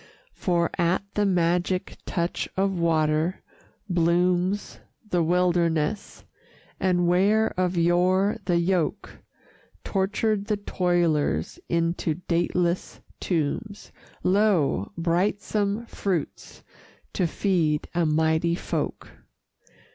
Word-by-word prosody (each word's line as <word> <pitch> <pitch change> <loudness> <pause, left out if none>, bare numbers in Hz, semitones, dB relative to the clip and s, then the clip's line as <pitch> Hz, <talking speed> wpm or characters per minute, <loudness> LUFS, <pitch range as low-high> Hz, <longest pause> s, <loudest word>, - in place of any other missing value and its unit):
For, 170 -2 0
at 175 +3 +2
the 205 -1 +1
magic 180 0 0
touch 170 0 -2
of 195 -1 0
water, 160 +1 +1 0.4
blooms 180 +2 +1 0.3
The 180 -4 +1
wilderness, 170 +1 0 0.5
and 175 -2 +2
where 205 +5 +3
of 180 -1 -1
yore 185 +5 +2
the 175 -2 +2
yoke 170 -1 -1 0.6
Tortured 205 +1 0
the 210 -1 -1
toilers 170 - 0
into 165 -1 0
dateless 175 +1 0 0.2
tombs, 185 +5 -3 0.3
Lo! 185 - +2
brightsome 200 +5 0
fruits 190 -7 -4 0.5
to 180 - +1
feed 165 -5 0
a 175 0 +1
mighty 160 +2 +2
folk. - - -4
175 Hz, 90 wpm, -25 LUFS, 170-195 Hz, 0.6 s, where